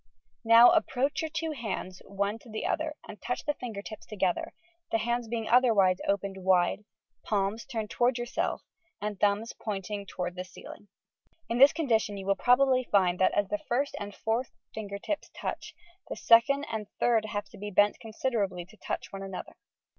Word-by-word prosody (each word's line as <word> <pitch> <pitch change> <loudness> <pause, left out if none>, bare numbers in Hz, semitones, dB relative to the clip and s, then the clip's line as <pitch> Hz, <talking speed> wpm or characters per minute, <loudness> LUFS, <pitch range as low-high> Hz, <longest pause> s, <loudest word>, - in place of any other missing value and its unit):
Now 230 +1 +8
approach 280 -4 +1
your 320 - -2
two 320 0 -3
bauds 185 -4 -4
one 200 +2 -2
to 235 - -16
the 215 0 -4
other 310 -1 -1
and 210 - -10
touch 245 - -3
the 295 - +1
finger 225 -7 -6
tips 215 - -9
together, 190 -4 -1 0.4
the - - +3
haads 235 +1 -1
being 225 -1 -3
otherwise 220 -7 +4
opened 200 -1 -1
wide, 185 +2 +2 0.4
palms 205 +2 -1
turned 220 -5 -4
towards 245 +1 +2
yourself 240 0 -2 0.4
and 210 -2 -4
thumbs 205 +3 +1
pointing 200 -1 -5
toward 180 -1 -4
the 180 0 -5
ceiling. 185 +2 -12 0.6
In 235 +1 0
this 275 +2 +9
condition 225 -10 0
you 195 - -7
will 195 0 +2
probably 255 +3 +4
find 180 -3 +3
that, 185 - +4
as 205 -1 +1
the 210 - -1
first 265 +7 -1
and 205 -1 -6
fourth 230 +3 -1 0.2
finger 205 -2 -5
tips 305 +9 -4
touch, - - -5 0.3
the - - -3
second 275 +5 +4
and 215 -2 -3
third 240 -1 +4
fingers 215 - -7
have 205 0 -2
to 205 - -14
be 205 +1 -5
bent 205 +1 +3
considerably 215 -6 -2
to 215 +5 -19
touch - - -5
one 195 - -6
another. 195 -1 -7
215 Hz, 185 wpm, -29 LUFS, 200-240 Hz, 0.6 s, this